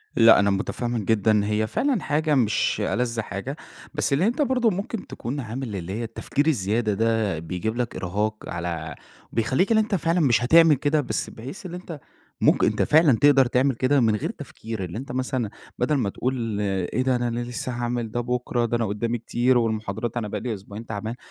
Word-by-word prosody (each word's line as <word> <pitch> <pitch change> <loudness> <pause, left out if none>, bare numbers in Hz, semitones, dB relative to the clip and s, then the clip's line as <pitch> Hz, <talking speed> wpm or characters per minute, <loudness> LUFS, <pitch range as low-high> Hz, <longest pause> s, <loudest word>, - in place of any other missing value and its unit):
لأ، 115 -2 +7
أنا 100 0 +3
متفهم 120 +4 -1
جدًا 110 0 +2
إن 105 -1 +3
هي 105 +1 0
فعلًا 255 - 0
حاجة 150 0 +1
مش 115 -5 +1
ألذ 115 -2 -1
حاجة، 115 +8 -5 0.4
بس 150 -2 0
اللي 160 +8 +3
أنت 245 +6 0
برضه 250 -4 +2
ممكن 200 +2 -4
تكون 135 +5 -5
عامل 115 -2 -5
اللي 95 +1 -5
هي 115 +2 -3
التفكير 140 +6 -2
الزيادة 110 -4 +1
ده، 110 -5 +1
بيجيب 90 +7 -3
لك 120 -1 -2
إرهاق، 105 +4 -3
على 85 -3 -4 0.4
بيخليك 130 - +1
اللي 220 - +5
أنت 210 -2 -1
فعلًا 170 +1 +1
مش 120 -5 +3
هتعمل 160 +3 +6
كده، 145 +2 +1
بس - - -3
بحيث 135 - -9
اللي 180 0 -5
أنت 170 -5 -8 0.4
ممكن - - +4
أنت - - 0
فعلًا 150 -6 +5
تقدر 140 -2 +6
تعمل 125 +1 +2
كده 135 +3 +2
من 110 -3 +3
غير - - -2
تفكير، 110 -4 -7
اللي 90 +4 -5
أنت 130 0 -6
مثلًا 130 -3 -2 0.3
بدل 135 +5 +2
ما 115 -7 0
تقول 115 -3 -2
إيه 95 +4 -1
ده! 130 -1 +2
أنا 120 -1 -1
لسه 120 +1 -4
هاعمل 120 -2 -2
ده 120 - -1
بُكرة، 120 0 -1
ده 120 +1 0
أنا 115 - 0
قدامي 115 +4 -1
كتير 120 +2 +1
والمحاضرات 110 +1 -2
أنا 110 -3 -2
بقى 105 0 -4
لي 120 - -2
أسبوعين 105 +3 -9
تعبان، 110 +2 -4
120 Hz, 195 wpm, -24 LUFS, 110-135 Hz, 0.4 s, لأ